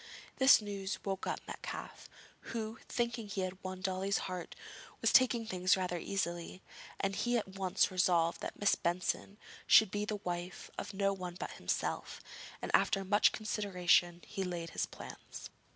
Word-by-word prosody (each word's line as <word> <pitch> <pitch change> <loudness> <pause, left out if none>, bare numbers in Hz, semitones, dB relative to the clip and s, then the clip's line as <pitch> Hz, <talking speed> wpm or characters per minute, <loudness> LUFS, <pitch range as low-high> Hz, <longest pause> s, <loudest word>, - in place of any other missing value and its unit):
This 265 -4 +7
news 200 -1 -3
woke 195 -1 -2
up - - -2
Metcalfe, - - -7 0.5
who, 220 0 -3
thinking 235 -2 -1
he 200 -1 -3
had 185 0 -4
won 185 0 -5
Dolly's 190 +1 0
heart, 180 -2 -5 0.4
was - - +2
taking 245 -3 +5
things 185 -3 +2
rather 180 -2 -1
easily, 175 -1 -3 0.4
and 195 0 0
he 240 +4 +1
at 210 - -3
once 190 -1 +1
resolved 175 -2 +2
that - - -6
Miss 205 - +4
Benson 180 +3 -1 0.3
should 220 -3 +7
be 205 0 -1
the 210 - -2
wife 175 -2 -5
of 200 - -6
no 195 0 +2
one 180 -2 -6
but - - -4
himself, - - -2 0.4
and - - -2
after 195 - +3
much 205 +2 +5
consideration 180 -5 +1
he 195 - -3
laid 175 -2 -4
his - - -1
plans. - - -10
195 Hz, 160 wpm, -34 LUFS, 180-205 Hz, 0.5 s, This